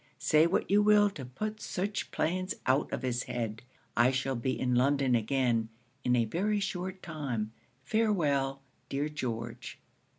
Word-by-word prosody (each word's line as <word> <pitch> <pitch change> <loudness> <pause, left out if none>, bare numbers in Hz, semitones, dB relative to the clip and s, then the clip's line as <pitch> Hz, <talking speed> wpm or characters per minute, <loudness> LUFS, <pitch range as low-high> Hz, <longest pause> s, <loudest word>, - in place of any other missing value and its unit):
Say 155 +2 +4
what 185 - 0
you 205 +1 +6
will 205 -1 +5
to 140 -9 -7
put 215 - -5
such 200 +3 -2
plans 185 +6 -1
out 130 +3 +2
of - - -3
his 125 -1 0
head. 115 -2 -3 0.3
I 120 +2 +5
shall 135 0 0
be 130 +2 -1
in 125 -1 +1
London 135 +1 +3
again, 120 -1 +1 0.3
in 125 - +3
a 120 -2 +3
very 205 - 0
short 190 -1 -4
time. 135 -10 -3 0.3
Farewell, 140 -8 +1 0.3
dear 145 +2 -1
George. 120 -5 -5
135 Hz, 155 wpm, -31 LUFS, 125-185 Hz, 0.3 s, you